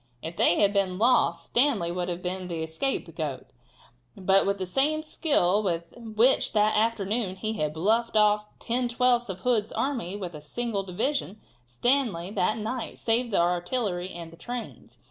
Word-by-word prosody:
If 165 +2 -6
they 175 - +3
had 200 -1 +4
been 190 -2 +1
lost 210 -7 +2
Stanley 235 -10 +2
would 180 0 -3
have 175 0 -5
been 185 0 -3
the 165 -2 -3
scapegoat, 160 +13 -3 0.7
but 195 0 +3
with 200 0 +1
the 190 - -3
same 295 +11 +1
skill 215 - +2
with 170 -4 -3
which 230 +2 +2
that 215 0 +3
afternoon 215 -2 0
he 215 +3 -3
had 155 -6 -2
bluffed 220 +7 +1
off 210 0 +4
ten 245 +1 -1
twelfths 240 -1 +2
of 190 -1 -6
Hood's 225 -3 +1
army 235 -10 -2
with 185 -4 -6
a 150 - -9
single 220 +7 -3
division, 210 +3 -2 0.3
Stanley 195 - 0
that 215 +2 0
night 225 +3 -4
saved 235 +2 +1
the 205 - 0
artillery 180 +2 0
and 170 -2 -8
the 165 - -15
trains. 245 +2 -8
205 Hz, 165 wpm, -26 LUFS, 180-240 Hz, 0.7 s, had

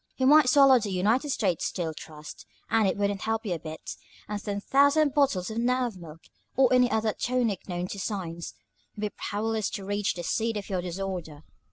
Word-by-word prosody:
You 260 - +1
might 295 -1 +7
swallow 275 -3 +7
the 210 - -4
United 215 +10 +1
States 190 - 0
Steel 165 -3 -3
Trust, 155 -1 -11 0.2
and 220 -3 +4
it 190 - 0
wouldn't 200 -1 -1
help 225 +1 -2
you 190 - -1
a 170 - -4
bit, 155 0 -8 0.3
and 205 -1 -4
ten 205 -1 -3
thousand 285 +5 +3
bottles 265 - +1
of 220 - -3
nerve 245 -2 0
milk, 165 -3 -11 0.3
or 260 -1 +4
any 250 -1 +5
other 220 -1 0
tonic 245 -6 -1
known 175 0 -2
to 200 - -6
science, 175 -5 -4 0.4
would 210 - -8
be 210 - -1
powerless 220 0 -2
to 195 - -6
reach 205 0 -1
the 175 - -5
seat 225 +3 -1
of 200 -1 -6
your 185 -2 0
disorder. 175 -4 -5
205 Hz, 200 wpm, -27 LUFS, 180-245 Hz, 0.4 s, might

